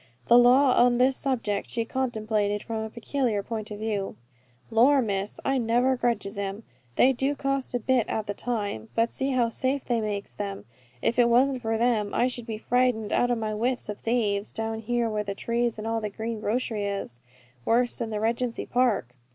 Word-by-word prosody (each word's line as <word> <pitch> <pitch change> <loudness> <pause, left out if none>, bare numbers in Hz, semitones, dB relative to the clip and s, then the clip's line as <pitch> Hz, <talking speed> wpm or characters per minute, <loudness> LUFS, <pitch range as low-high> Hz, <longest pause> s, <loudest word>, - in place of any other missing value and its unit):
The 240 - +6
law 255 +2 +6
on 245 -1 +3
this 255 +2 +3
subject 230 -8 -2
she 230 -1 -1
contemplated 215 -5 -1
from 225 -1 -4
a 220 - -4
peculiar 235 -2 -1
point 215 -1 -5
of 210 - -6
view. 210 -2 -3 0.6
"Lor, 255 +6 +5
Miss, 200 -4 -2
I 270 -1 +2
never 245 +3 +2
grudges 215 -5 -1
'em. 200 +2 -4 0.3
They 265 +2 +5
do 270 +3 0
cost 275 -2 -1
a - - +1
bit 250 0 +1
at 220 - -2
the 205 - -3
time; 205 - -3
but 230 +1 +1
see 270 - -1
how 240 -2 +2
safe 265 +3 -1
they 235 -2 0
makes 205 -2 -4
them. 200 -1 -5 0.4
If 235 - +1
it 240 -1 +5
wasn't 255 +2 +3
for 225 -1 -1
them 220 -3 +1
I - - +3
should 245 -2 -4
be 220 -2 -4
frightened 245 -2 +1
out 245 - +2
of 245 - +1
my 215 -1 -2
wits 245 +2 -1
of 210 - -5
thieves, 215 -4 0
down 225 0 -3
here 240 +1 0
where 215 -1 -1
the 200 -1 -4
trees 235 +2 -1
and 215 - -6
all 225 0 -1
the 210 - -2
green 220 +2 -4
grocery 220 -1 -1
is, 195 -12 -4 0.4
worse 240 - +2
than 230 -2 -2
the 215 -1 -2
Regency 230 +2 -1
Park. 245 - +1
230 Hz, 200 wpm, -26 LUFS, 210-245 Hz, 0.6 s, The